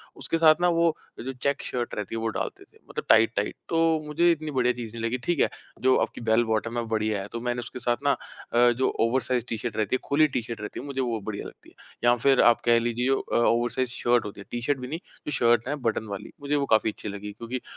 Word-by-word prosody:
उसके 165 Hz, -, -2 dB
साथ 155 Hz, -1 st, +7 dB
ना 175 Hz, -, +4 dB
वो 165 Hz, -2 st, +3 dB, 0.2 s
जो 130 Hz, +3 st, -4 dB
चेक 140 Hz, +3 st, -1 dB
शर्ट 120 Hz, -1 st, -3 dB
रहती 105 Hz, +2 st, -4 dB
है -, -, -2 dB
वो 115 Hz, -, -1 dB
डालते -, -, -5 dB
थे -, -, -24 dB
मतलब -, -, -5 dB
टाइट-टाइट 110 Hz, -2 st, +4 dB
तो 165 Hz, -, +1 dB, 0.3 s
मुझे 170 Hz, +3 st, +3 dB
इतनी 155 Hz, -2 st, -2 dB
बढ़िया 125 Hz, -2 st, +2 dB
चीज़ 115 Hz, -2 st, -7 dB
नहीं 115 Hz, -, -5 dB
लगी 120 Hz, +3 st, 0 dB
ठीक 175 Hz, -, 0 dB
है -, -, +4 dB, 0.3 s
जो 130 Hz, 0 st, +4 dB
आपकी -, -, -11 dB
बेल 115 Hz, +1 st, +3 dB
बॉटम 110 Hz, +1 st, -1 dB
हैं -, -, +1 dB
वो -, -, -8 dB
बढ़िया 110 Hz, -2 st, 0 dB
है 100 Hz, -, -7 dB
तो 115 Hz, -, -3 dB
मैंने 120 Hz, 0 st, -1 dB
उसके 120 Hz, +1 st, -7 dB
साथ 120 Hz, -1 st, 0 dB
ना 140 Hz, -, +4 dB, 0.4 s
अ, 120 Hz, 0 st, +6 dB
जो 130 Hz, +2 st, +1 dB
ओवर 120 Hz, +3 st, +2 dB
साइज़्ड 125 Hz, -2 st, -1 dB
टी 115 Hz, -, -3 dB
शर्ट 110 Hz, -1 st, -4 dB
रहती 110 Hz, +3 st, +1 dB
है -, -, -1 dB
खुली 155 Hz, +2 st, +4 dB
टी 130 Hz, -3 st, -2 dB
शर्ट 115 Hz, -1 st, -7 dB
रहती 105 Hz, -, -6 dB
है -, -, -7 dB
मुझे 135 Hz, -2 st, -2 dB
वो 115 Hz, -3 st, -1 dB
बढ़िया 100 Hz, 0 st, -5 dB
लगती -, -, -15 dB
है -, -, -25 dB, 0.3 s
या 120 Hz, -, +6 dB
फ़िर 135 Hz, +2 st, +4 dB
आप 120 Hz, -, +5 dB
कह 120 Hz, 0 st, +5 dB
लीजिए 120 Hz, +2 st, -1 dB
अ, 135 Hz, -, 0 dB
ओवर 120 Hz, 0 st, +3 dB
साइज़्ड 130 Hz, -2 st, -1 dB
शर्ट 120 Hz, -2 st, +2 dB
होती 100 Hz, -, -7 dB
है -, -, -11 dB
टी-शर्ट 130 Hz, +3 st, -1 dB
भी 125 Hz, -, -6 dB
नहीं 160 Hz, +5 st, -4 dB, 0.3 s
जो -, -, -1 dB
शर्ट 120 Hz, -2 st, +3 dB
है 145 Hz, -, -1 dB
बटन 110 Hz, 0 st, 0 dB
वाली 100 Hz, -1 st, -7 dB
मुझे 145 Hz, +1 st, 0 dB
वो 140 Hz, -1 st, +1 dB
काफ़ी 110 Hz, -, +2 dB
अच्छी 105 Hz, -, -7 dB
लगी 100 Hz, +1 st, -6 dB
क्योंकि 120 Hz, +4 st, -5 dB
120 Hz, 265 wpm, -26 LUFS, 115-135 Hz, 0.4 s, साथ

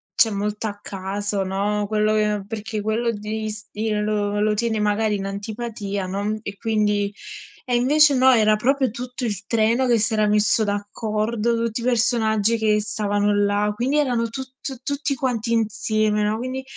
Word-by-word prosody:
cioè 225 Hz, -, +4 dB
molto 210 Hz, +2 st, -3 dB
a 205 Hz, -1 st, -6 dB
caso, 200 Hz, +1 st, -3 dB
no, 200 Hz, +2 st, -1 dB
quello 215 Hz, 0 st, +1 dB
che 210 Hz, -1 st, +1 dB
perché 220 Hz, 0 st, -4 dB
quello 220 Hz, +3 st, 0 dB
ti 215 Hz, +1 st, -4 dB
s 210 Hz, -1 st, -8 dB
ti 220 Hz, +1 st, -2 dB
lo 210 Hz, -1 st, 0 dB
lo 215 Hz, 0 st, +2 dB
tieni 225 Hz, 0 st, 0 dB
magari 210 Hz, +1 st, +1 dB
in 195 Hz, -, -5 dB
antipatia, 205 Hz, -1 st, -4 dB
no, 205 Hz, +3 st, -2 dB
e 200 Hz, -2 st, -7 dB
quindi 210 Hz, -2 st, 0 dB, 0.6 s
e 245 Hz, -, +2 dB
invece 285 Hz, +4 st, +5 dB
no, 260 Hz, +1 st, +6 dB
era 215 Hz, -3 st, +4 dB
proprio 265 Hz, +4 st, +1 dB
tutto 250 Hz, +2 st, -5 dB
il 210 Hz, -3 st, -3 dB
treno 230 Hz, +4 st, +2 dB
che 235 Hz, -2 st, +3 dB
si 225 Hz, +1 st, +1 dB
era 215 Hz, -1 st, +2 dB
messo 210 Hz, +1 st, +3 dB
d'accordo, 215 Hz, +2 st, -1 dB
tutti 230 Hz, +1 st, -3 dB
i -, -, -6 dB
personaggi 230 Hz, -2 st, +2 dB
che 215 Hz, -1 st, +2 dB
stavano 205 Hz, -1 st, 0 dB
là, 205 Hz, +1 st, +1 dB
quindi 255 Hz, +6 st, 0 dB
erano 245 Hz, -6 st, +1 dB
tut 260 Hz, +2 st, -7 dB, 0.3 s
tutti 285 Hz, 0 st, -1 dB
quanti 245 Hz, -3 st, -2 dB
insieme, 215 Hz, -1 st, +1 dB
no. 210 Hz, +1 st, 0 dB
Quindi 255 Hz, +3 st, -4 dB
215 Hz, 170 wpm, -22 LUFS, 205-235 Hz, 0.6 s, no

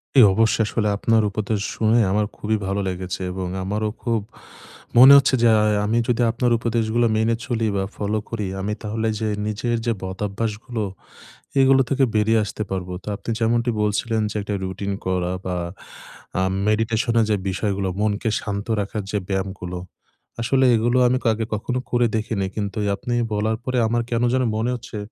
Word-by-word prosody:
ই 135 Hz, -, +9 dB
অবশ্য, 110 Hz, +2 st, +3 dB
আসলে 105 Hz, 0 st, -1 dB
আপনার 115 Hz, +2 st, +3 dB
উপদেশ 105 Hz, +1 st, -2 dB, 0.2 s
শুনে 110 Hz, +1 st, +3 dB
আমার 105 Hz, +2 st, +2 dB
খুবই 110 Hz, +1 st, 0 dB
ভালো 100 Hz, +1 st, -1 dB
লেগেছে 90 Hz, 0 st, -4 dB
এবং 90 Hz, 0 st, -4 dB, 0.2 s
আমারও 105 Hz, +3 st, -1 dB
খুব 115 Hz, -2 st, +1 dB, 0.8 s
মনে 130 Hz, +3 st, +10 dB
হচ্ছে 135 Hz, -1 st, +4 dB
যে 120 Hz, -, +5 dB
আ -, -, +3 dB, 0.2 s
আমি 110 Hz, +3 st, +1 dB
যদি 120 Hz, 0 st, +1 dB
আপনার 120 Hz, +1 st, 0 dB
উপদেশগুলো 115 Hz, 0 st, +1 dB
মেনে 110 Hz, +1 st, +2 dB
চলি 115 Hz, -2 st, 0 dB
বা, 95 Hz, -, 0 dB
ফলো 105 Hz, +1 st, -1 dB
করি, 105 Hz, -4 st, -3 dB
আমি 105 Hz, +2 st, -2 dB
তাহলে 110 Hz, +1 st, -2 dB
যে 110 Hz, -, -1 dB, 0.2 s
নিজের 115 Hz, +3 st, -1 dB
যে 120 Hz, -, +2 dB
বদভ্যাসগুলো, 105 Hz, +4 st, -3 dB, 0.8 s
এগুলো 135 Hz, 0 st, +5 dB
থেকে 135 Hz, 0 st, +2 dB
বেরিয়ে 110 Hz, +1 st, +3 dB
আসতে 105 Hz, -, -4 dB
পারবো। 90 Hz, -1 st, -3 dB
তো -, -, -19 dB
আপনি 100 Hz, +3 st, -8 dB
যেমনটি 115 Hz, +1 st, +1 dB
বলছিলেন 110 Hz, +2 st, 0 dB
যে -, -, -8 dB
একটা 105 Hz, +1 st, -4 dB
রুটিন 95 Hz, +1 st, -3 dB
করা 90 Hz, -1 st, 0 dB
বা, 90 Hz, -1 st, -2 dB, 0.8 s
আ -, -, +2 dB, 0.2 s
মেডিটেশনের 115 Hz, +1 st, +2 dB
যে -, -, +4 dB
বিষয়গুলো, 95 Hz, 0 st, -1 dB
মনকে 105 Hz, +1 st, 0 dB
শান্ত 100 Hz, -1 st, -4 dB
রাখার 100 Hz, +1 st, -3 dB
যে 105 Hz, -, 0 dB
ব্যায়ামগুলো, 95 Hz, -2 st, -3 dB, 0.6 s
আসলে 130 Hz, +3 st, +2 dB
এগুলো 120 Hz, +3 st, +2 dB
আমি 125 Hz, +1 st, +2 dB, 0.2 s
আগে 110 Hz, +1 st, -2 dB
কখনো 125 Hz, +4 st, -2 dB
করে 120 Hz, 0 st, +3 dB
দেখিনি। 110 Hz, -2 st, -2 dB
কিন্তু 100 Hz, -1 st, -3 dB
এই -, -, 0 dB
আপনি 125 Hz, -1 st, -4 dB, 0.2 s
বলার 110 Hz, +1 st, 0 dB
পরে 130 Hz, -1 st, -1 dB
আমার 120 Hz, +1 st, +1 dB
কেন 115 Hz, 0 st, +1 dB
জানি 130 Hz, 0 st, +2 dB
মনে 115 Hz, +3 st, 0 dB
হচ্ছে 120 Hz, -2 st, -8 dB
110 Hz, 170 wpm, -22 LUFS, 100-115 Hz, 0.8 s, মনে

